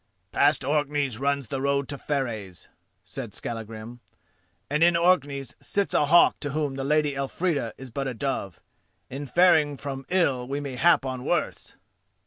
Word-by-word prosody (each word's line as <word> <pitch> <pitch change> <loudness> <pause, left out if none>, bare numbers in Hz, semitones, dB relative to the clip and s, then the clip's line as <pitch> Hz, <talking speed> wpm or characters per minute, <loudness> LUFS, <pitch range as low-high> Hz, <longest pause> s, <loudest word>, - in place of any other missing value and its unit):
"Past - - +3
Orkneys 145 -4 0
runs 140 0 0
the 135 - -3
road 140 -1 +1
to 145 - -3
Fareys," 110 - -4 0.4
said - - -7
Skallagrim, 115 +1 -6 0.7
"and 150 +2 -1
in 170 0 +5
Orkneys 145 -7 +1
sits 200 -1 -1
a 145 - +3
hawk 170 +3 +5
to 145 -2 -4
whom 150 -3 -1
the 135 0 -4
Lady 150 +1 +2
Elfrida 140 -2 -1
is 130 -2 -10
but 135 +3 -3
a 130 - -4
dove. 115 -8 -3 0.5
In 140 +2 -5
faring 155 -3 +4
from 135 -1 -6
ill 140 -9 +1
we 140 +2 -2
may 140 -3 -5
hap 165 +1 +4
on 130 -1 -4
worse." - - -2
140 Hz, 160 wpm, -26 LUFS, 130-150 Hz, 0.7 s, in